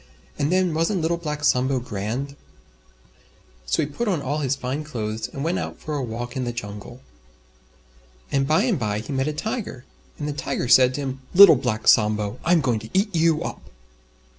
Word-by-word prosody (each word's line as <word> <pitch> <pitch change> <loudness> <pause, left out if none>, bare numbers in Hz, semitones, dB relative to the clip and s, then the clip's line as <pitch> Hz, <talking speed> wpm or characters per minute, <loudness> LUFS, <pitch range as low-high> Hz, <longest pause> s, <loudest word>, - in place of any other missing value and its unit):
And 145 +3 +1
then 185 -2 +2
wasn't 165 +4 0
Little 165 +2 0
Black 150 -3 -5
Sambo 130 -1 +2
grand? 120 +5 -4 1.3
So - - +1
he - - 0
put 225 +11 -4
on 185 -6 +1
all 145 +2 -2
his 140 -2 0
Fine 135 +3 -4
Clothes 110 -7 -4
and 135 - -6
went 170 +3 0
out - - -5
for 155 - -5
a 145 - -1
walk 120 0 -5
in 130 - -2
the 120 - -2
Jungle. 105 +2 -8 1.3
And 135 -1 +1
by 155 +6 +3
and 230 - +1
by 105 -3 -1
he 140 - -6
met 135 +1 0
a - - 0
Tiger. 210 - -5 0.3
And 150 - -4
the 150 - -2
Tiger 135 - -3
said 130 +1 +6
to 145 - -3
him, 135 -1 -5
"Little 195 -4 +10
Black 120 -4 -2
Sambo, 105 +1 +3
I'm 170 0 +3
going 120 -5 0
to 110 +1 -11
eat 200 +1 +1
you 165 -1 +2
up!" - - -6
135 Hz, 195 wpm, -23 LUFS, 120-160 Hz, 1.3 s, Little